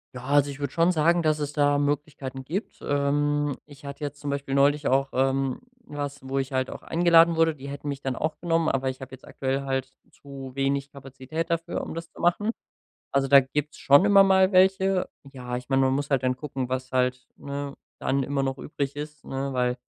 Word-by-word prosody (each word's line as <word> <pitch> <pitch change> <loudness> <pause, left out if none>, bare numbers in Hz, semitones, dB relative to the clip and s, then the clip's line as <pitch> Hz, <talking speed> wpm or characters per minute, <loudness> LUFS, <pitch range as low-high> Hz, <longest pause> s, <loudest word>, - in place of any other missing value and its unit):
Ja, 125 - -7
also 145 +1 +3
ich 140 0 -7
würde 140 - -2
schon 170 +2 +3
sagen, 170 +2 +3
dass 155 -1 +2
es 145 -1 -2
da 145 -1 +2
Möglichkeiten 145 -2 -3
gibt. 190 +9 -4
Ähm, 145 0 0
ich 145 -1 -16
hatte 140 +1 -8
jetzt 145 0 -7
zum 145 - -4
Beispiel 140 -1 -2
neulich 145 +1 +3
auch, 135 +1 +2
ähm, 135 0 0 0.2
was, 145 -3 -6
wo 135 +1 -2
ich 135 0 -3
halt 130 0 0
auch - - -8
eingeladen 170 0 +5
wurde. 165 0 +3
Die 140 -1 -10
hätten 140 +1 -6
mich 140 -1 -4
dann 135 -2 -2
auch 155 +1 -3
genommen, 165 -1 +1
aber 135 0 0
ich 130 - -7
hab 130 0 -8
jetzt 130 - -12
aktuell 135 +1 -2
halt 135 -1 -2 0.2
zu 135 -2 -10
wenig 140 0 0
Kapazität 135 +4 -6
dafür, 165 0 -2
um - - -6
das 165 0 -6
zu - - -11
machen. 190 +6 +2 0.6
Also, 140 0 +1
da 140 0 +8
gibt's 145 +3 -4
schon 140 +6 +6
immer 200 -1 +7
mal 190 0 +4
welche. 190 0 +3 0.2
Ja, 125 -2 -5
ich 125 +2 -8
mein, 135 0 +3
man 130 0 +3
muss 140 +1 -2
halt 135 -2 +2
dann 130 0 +1
gucken, 130 -3 -4
was 130 0 -4
halt, 125 0 0
ne, 140 0 -5 0.2
dann 135 +1 0
immer 140 +1 -1
noch 135 0 -2
übrig 140 -2 -4
ist, 150 0 -8
ne, 135 0 -4
weil 125 0 0
140 Hz, 215 wpm, -26 LUFS, 135-150 Hz, 0.6 s, da